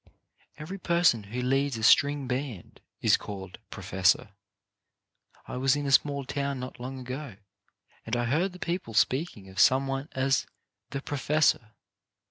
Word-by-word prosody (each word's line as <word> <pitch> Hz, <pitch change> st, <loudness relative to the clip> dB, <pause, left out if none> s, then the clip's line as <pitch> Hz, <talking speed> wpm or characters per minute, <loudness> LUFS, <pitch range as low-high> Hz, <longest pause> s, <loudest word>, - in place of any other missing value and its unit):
" -, -, -35 dB
Every 160 Hz, +6 st, -7 dB
person 170 Hz, -, +2 dB
who 120 Hz, +5 st, -4 dB
leads 135 Hz, 0 st, +1 dB
a 110 Hz, -, -6 dB
string 145 Hz, +4 st, +5 dB
band 125 Hz, -6 st, -5 dB, 0.2 s
is -, -, +4 dB
called 95 Hz, -2 st, -8 dB
" -, -, -50 dB
Professor." 95 Hz, +2 st, +1 dB, 1.2 s
I -, -, -5 dB
was 135 Hz, +2 st, +3 dB
in 145 Hz, 0 st, -3 dB
a 140 Hz, -, -1 dB
small 140 Hz, +1 st, +3 dB
town 140 Hz, 0 st, -2 dB
not 125 Hz, 0 st, -7 dB
long 130 Hz, +1 st, -6 dB
ago, 130 Hz, -1 st, -6 dB, 0.7 s
and 115 Hz, -, -2 dB
I 120 Hz, 0 st, 0 dB
heard 165 Hz, +10 st, 0 dB
the -, -, -10 dB
people 170 Hz, -, -4 dB
speaking 130 Hz, -, +1 dB
of 95 Hz, 0 st, -8 dB
some 130 Hz, +8 st, +5 dB
one 135 Hz, +2 st, -3 dB
as 135 Hz, 0 st, +1 dB, 0.4 s
"the 140 Hz, -, -4 dB
profes 145 Hz, +2 st, +2 dB
sor." 110 Hz, -2 st, -13 dB
135 Hz, 165 wpm, -28 LUFS, 120-145 Hz, 1.2 s, string